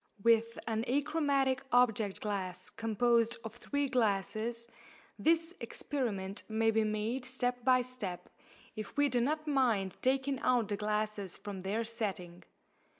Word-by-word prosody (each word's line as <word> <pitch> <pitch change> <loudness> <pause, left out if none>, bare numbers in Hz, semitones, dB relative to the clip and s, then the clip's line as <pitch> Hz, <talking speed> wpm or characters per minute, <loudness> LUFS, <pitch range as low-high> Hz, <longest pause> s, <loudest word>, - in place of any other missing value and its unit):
With 230 0 +4
an 225 0 -1
achromatic 280 -1 +1
object 225 -5 +3
glass 185 -3 -3
composed 230 +1 +2
of 225 +1 -8
three 285 +3 -1
glasses, 230 0 0 0.5
this 330 +1 +3
experiment 205 -9 -3
may 225 +1 +2
be 220 0 +2
made 215 +4 -1
step 250 -1 -1
by 255 0 +5
step, 200 -9 -4 0.5
if 215 +6 -7
we 290 0 +4
do 245 -2 +1
not 305 +5 0
mind 235 -10 +1
taking 265 +1 +1
out 245 -4 +2
the 205 - 0
glasses 210 -2 -2
from 205 -2 -6
their 200 +5 -1
setting. 195 -6 -4
230 Hz, 135 wpm, -33 LUFS, 210-255 Hz, 0.5 s, by